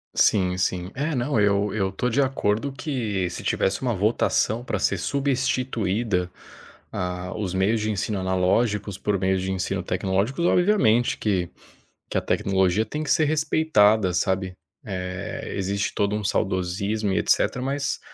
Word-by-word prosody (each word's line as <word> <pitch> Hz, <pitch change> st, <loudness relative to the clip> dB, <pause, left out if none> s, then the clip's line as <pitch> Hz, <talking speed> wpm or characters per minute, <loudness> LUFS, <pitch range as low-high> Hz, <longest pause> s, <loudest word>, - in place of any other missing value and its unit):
Sim 90 Hz, -3 st, +3 dB
sim. 90 Hz, 0 st, -1 dB
É 150 Hz, +4 st, -1 dB
não, 125 Hz, -2 st, 0 dB
eu 100 Hz, 0 st, +2 dB
eu 95 Hz, -3 st, 0 dB
estou 115 Hz, +6 st, -2 dB
de 130 Hz, +5 st, +2 dB
acordo 130 Hz, -1 st, 0 dB
que 120 Hz, -, -2 dB
se 85 Hz, -, -7 dB
tivesse 95 Hz, 0 st, 0 dB
uma 125 Hz, -2 st, 0 dB
votação 110 Hz, +2 st, +1 dB
pra 105 Hz, -5 st, -2 dB
ser 95 Hz, -, +1 dB
substituída, 120 Hz, -7 st, -1 dB, 0.6 s
ah, 90 Hz, 0 st, -4 dB
os 95 Hz, -4 st, -3 dB
meios 105 Hz, +4 st, +1 dB
de 110 Hz, 0 st, 0 dB
ensino 100 Hz, 0 st, -2 dB
analógicos 95 Hz, +2 st, 0 dB
por 100 Hz, 0 st, -1 dB
meios 95 Hz, 0 st, +1 dB
de 95 Hz, +1 st, -2 dB
ensino 95 Hz, 0 st, -2 dB
tecnológicos 95 Hz, -, -1 dB
obviamente 175 Hz, -, +3 dB
que 95 Hz, -5 st, 0 dB, 0.6 s
que -, -, 0 dB
a -, -, +1 dB
tecnologia 95 Hz, +2 st, +1 dB
tem 150 Hz, +8 st, -4 dB
que 150 Hz, -, -3 dB
ser 155 Hz, -, +4 dB
respeitada, 145 Hz, -, +3 dB
sabe, 95 Hz, 0 st, 0 dB, 0.3 s
eh, 90 Hz, -1 st, -5 dB
existe 100 Hz, +1 st, -1 dB
todo 100 Hz, 0 st, 0 dB
um 105 Hz, -, -3 dB
saudosismo 100 Hz, +2 st, -1 dB
e -, -, +2 dB
etcetera, 125 Hz, -, +1 dB
mas 140 Hz, +1 st, -1 dB
105 Hz, 150 wpm, -24 LUFS, 95-120 Hz, 0.6 s, ser